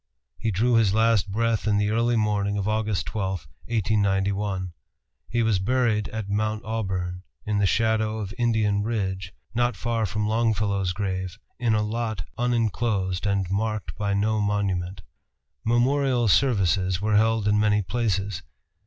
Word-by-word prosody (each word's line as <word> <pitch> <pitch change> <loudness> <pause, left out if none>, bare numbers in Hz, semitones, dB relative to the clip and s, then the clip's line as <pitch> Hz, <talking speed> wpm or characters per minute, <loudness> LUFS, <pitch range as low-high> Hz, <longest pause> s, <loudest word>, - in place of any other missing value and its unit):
He 115 - -1
drew 115 +5 +1
his 105 -3 +3
last 110 -3 +3
breath 115 0 0
in 105 -1 +3
the 105 0 +1
early 115 +2 +2
morning 105 -2 +1
of 100 - -1
Aug. 110 -1 0
12, 100 -4 -2 0.4
1891. 100 -3 0 0.6
He 120 0 +1
was 110 -4 +2
buried 110 0 +1
at 110 -2 -5
Mount 110 +2 -1
Auburn, 95 -5 -3 0.2
in 105 -1 0
the 100 - +3
shadow 110 0 +1
of 100 -2 -5
Indian 110 -4 +2
Ridge, 95 -4 -2 0.2
not 120 -1 +1
far 115 +1 -1
from 105 +3 -2
Longfellow's 105 -4 +1
grave, 95 -2 -3 0.2
in 115 -3 +2
a 105 - +1
lot 110 -3 -2
unenclosed 110 -5 0
and 100 -2 0
marked 110 0 -2
by 100 -1 -1
no 105 +1 +1
monument. 95 -3 -1 0.6
Memorial 125 +1 +2
services 95 - +2
were 105 +1 +1
held 110 -1 +2
in 105 0 +3
many 105 -1 +3
places. 100 -2 -1
105 Hz, 145 wpm, -25 LUFS, 100-115 Hz, 0.6 s, his